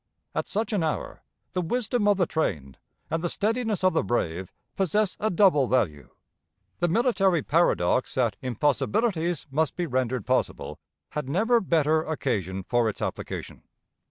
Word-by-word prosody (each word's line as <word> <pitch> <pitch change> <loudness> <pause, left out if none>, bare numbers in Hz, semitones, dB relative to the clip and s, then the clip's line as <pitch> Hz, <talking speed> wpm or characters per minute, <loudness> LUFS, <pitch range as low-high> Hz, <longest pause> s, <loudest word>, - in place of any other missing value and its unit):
At - - -2
such 215 +1 -2
an 200 - +1
hour, 160 -1 -3 0.3
the 180 - 0
wisdom 225 +4 0
of 205 -2 +4
the 180 - +3
trained 75 - -2 0.3
and 165 +1 -1
the 175 - 0
steadiness 220 0 0
of 185 - +4
the - - +2
brave 95 -4 -2 0.2
possess 195 +2 +1
a 215 - +1
double 175 -8 +4
value. 100 - 0 0.7
The 175 - +2
military 195 - +2
paradox 135 - +2
that 120 -6 +1
impossibilities 165 - 0
must 155 0 0
be 175 - -1
rendered 130 -3 -1
possible, 130 0 -1 0.3
had 150 -3 -4
never 225 - +3
better 160 -3 +2
occasion 100 - -2
for 120 +2 +1
its 105 - -6
application. - - -5
160 Hz, 150 wpm, -26 LUFS, 125-200 Hz, 0.7 s, of